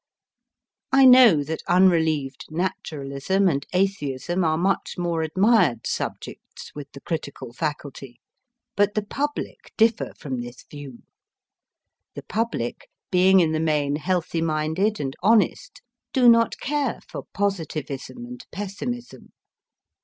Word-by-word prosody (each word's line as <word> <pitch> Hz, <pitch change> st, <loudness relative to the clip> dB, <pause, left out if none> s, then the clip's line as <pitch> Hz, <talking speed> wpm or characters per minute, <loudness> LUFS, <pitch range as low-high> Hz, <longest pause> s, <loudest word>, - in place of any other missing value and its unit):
I 270 Hz, 0 st, +6 dB
know 250 Hz, -, +7 dB
that 160 Hz, +3 st, -5 dB
unrelieved 160 Hz, -7 st, +2 dB
naturalism 155 Hz, +1 st, -1 dB
and 140 Hz, -5 st, -1 dB
atheism 180 Hz, -3 st, -1 dB
are 160 Hz, -1 st, +1 dB
much 190 Hz, +4 st, -1 dB
more 170 Hz, -2 st, -1 dB
admired 175 Hz, -, +2 dB
subjects -, -, -6 dB
with 145 Hz, -1 st, -9 dB
the 140 Hz, -, -11 dB
critical 140 Hz, -7 st, -5 dB
faculty; 135 Hz, -2 st, -5 dB, 0.6 s
but 205 Hz, +1 st, +2 dB
the 215 Hz, -, 0 dB
public 290 Hz, +7 st, -4 dB
differ 225 Hz, 0 st, +2 dB
from 130 Hz, -4 st, -5 dB
this 120 Hz, 0 st, -10 dB
view. 140 Hz, -4 st, -11 dB, 1.1 s
The -, -, -7 dB
public, 215 Hz, -, -3 dB, 0.2 s
being 185 Hz, +1 st, +5 dB
in 160 Hz, -2 st, +2 dB
the 155 Hz, -, 0 dB
main 150 Hz, -3 st, +1 dB
healthy 170 Hz, 0 st, -1 dB
minded 160 Hz, +7 st, 0 dB
and 135 Hz, -2 st, -3 dB
honest, 230 Hz, -, +1 dB, 0.3 s
do 255 Hz, -3 st, +4 dB
not 230 Hz, -1 st, +5 dB
care 285 Hz, -3 st, -2 dB
for -, -, -8 dB
positivism 170 Hz, -, -3 dB
and 250 Hz, 0 st, -10 dB
pessimism. 230 Hz, +5 st, -6 dB
170 Hz, 120 wpm, -24 LUFS, 145-205 Hz, 1.1 s, know